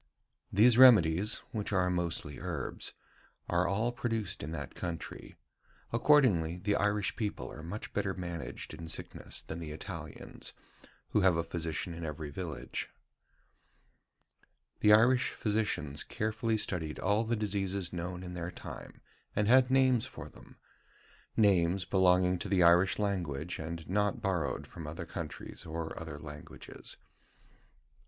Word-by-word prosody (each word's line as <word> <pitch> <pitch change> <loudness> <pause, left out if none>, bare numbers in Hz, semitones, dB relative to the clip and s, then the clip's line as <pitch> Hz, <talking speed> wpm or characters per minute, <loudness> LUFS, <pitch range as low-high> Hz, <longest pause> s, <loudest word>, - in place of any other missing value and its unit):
These 115 +4 +6
remedies 105 -6 +6
[which 105 -2 -3
are 90 -2 +3
mostly 85 -5 -2
herbs], - - -4 0.5
are 85 +1 +2
all 110 +5 +1
produced 110 -5 -2
in 70 - -5
that 70 -5 -5
country. 85 -3 -6 0.6
Accordingly, 115 - +4
the 100 +3 0
Irish 105 -1 +1
people 105 -3 -3
are - - -9
much 90 +7 -6
better 100 -2 -1
managed 85 -3 -5
in 85 - -8
sickness 80 - -5
than 80 - -6
the 80 -2 -6
Italians, 75 +1 -7 0.6
who 105 - +2
have 95 -3 +5
a 85 - +1
physician 85 0 -3
in 85 0 -7
every 75 -1 -5
village." 85 +1 -5 1.9
The 105 - +5
Irish 120 +4 +6
physicians 105 -10 -1
carefully 110 +1 -1
studied 80 -7 -2
all 105 +4 +2
the 115 +1 0
diseases 100 -3 -2
known 90 +1 -4
in 90 -1 -7
their 85 -1 -4
time, 90 - -9 0.3
and 105 - +2
had 130 +2 +6
names 130 -3 +4
for - - -9
them - - -16 0.8
names 95 -3 +4
belonging 90 -1 +4
to 100 - -5
the 95 -2 +4
Irish 85 +2 +5
language, 90 -6 -2
and 80 +1 -5
not 105 +6 +1
borrowed 95 -8 -1
from 80 -3 -9
other 80 +2 -5
countries 80 -3 -7
or 80 0 -4
other 80 -3 -6
languages. 75 -1 -10
90 Hz, 135 wpm, -32 LUFS, 85-105 Hz, 1.9 s, These